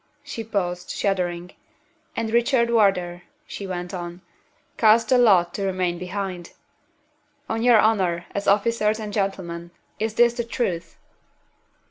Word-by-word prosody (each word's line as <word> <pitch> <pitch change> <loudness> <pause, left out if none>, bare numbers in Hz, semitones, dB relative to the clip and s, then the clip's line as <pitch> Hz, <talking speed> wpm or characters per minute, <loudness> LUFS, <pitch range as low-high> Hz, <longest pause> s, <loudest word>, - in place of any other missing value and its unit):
She 225 - -6
paused, 180 -5 -3
shuddering. 180 -2 -2 0.6
"And 225 -1 -2
Richard 235 0 +2
Wardour," 185 -6 +2 0.2
she 200 - -7
went 180 0 -5
on, 175 0 -6 0.5
"cast 225 +1 +4
the 255 - +5
lot 185 -7 +4
to 200 - -3
remain 185 -2 -1
behind. 180 -1 -5 0.9
On 225 - -2
your 240 -1 +6
honor, 185 -6 +2
as 200 0 -3
officers 215 +1 +2
and 210 -1 -6
gentlemen, 180 -4 -3 0.3
is 220 0 -2
this 240 0 +5
the 240 0 -2
truth?" 220 -7 -3
195 Hz, 130 wpm, -23 LUFS, 180-225 Hz, 0.9 s, your